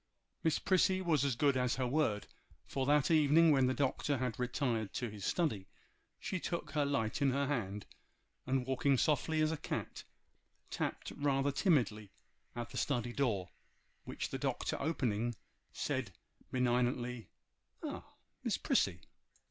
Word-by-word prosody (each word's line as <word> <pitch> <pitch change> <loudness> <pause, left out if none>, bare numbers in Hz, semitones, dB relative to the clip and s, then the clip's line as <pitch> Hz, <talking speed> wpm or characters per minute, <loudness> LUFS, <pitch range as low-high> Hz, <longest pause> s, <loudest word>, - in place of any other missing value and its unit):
Miss 160 -2 +3
Prissy 185 0 +3
was 165 -7 +2
as 140 -4 +1
good 140 +2 +3
as 125 -1 +1
her 130 - -1
word, 120 -6 +1 0.4
for 135 -1 -2
that 150 +2 +4
evening 155 +1 +6
when 135 -3 +4
the 130 - +2
Doctor 140 +1 0
had 125 -2 -2
retired 120 -4 -1
to 120 -3 -3
his 105 -2 -9
study, 110 - 0 0.5
she 185 - -3
took 170 0 -3
her 145 -2 +1
light 110 -5 -1
in 140 - +4
her 140 +2 +1
hand, 105 -8 -2 0.6
and 130 -1 +1
walking 135 +1 +2
softly 155 +3 +2
as 155 0 +3
a 160 - -2
cat, - - -4 0.7
tapped - - -3
rather 140 -1 +1
timidly 120 - +1 0.5
at 120 0 -5
the - - -6
study 120 -4 0
door, 110 -10 0 0.5
which - - -4
the - - -4
Doctor - - -1
opening, 120 -6 0 0.4
said 130 -8 -2 0.4
benignantly— 125 -1 0 0.5
'Ah! - - -4 0.4
Miss - - 0
Prissy! - - +1
130 Hz, 150 wpm, -34 LUFS, 120-145 Hz, 0.7 s, evening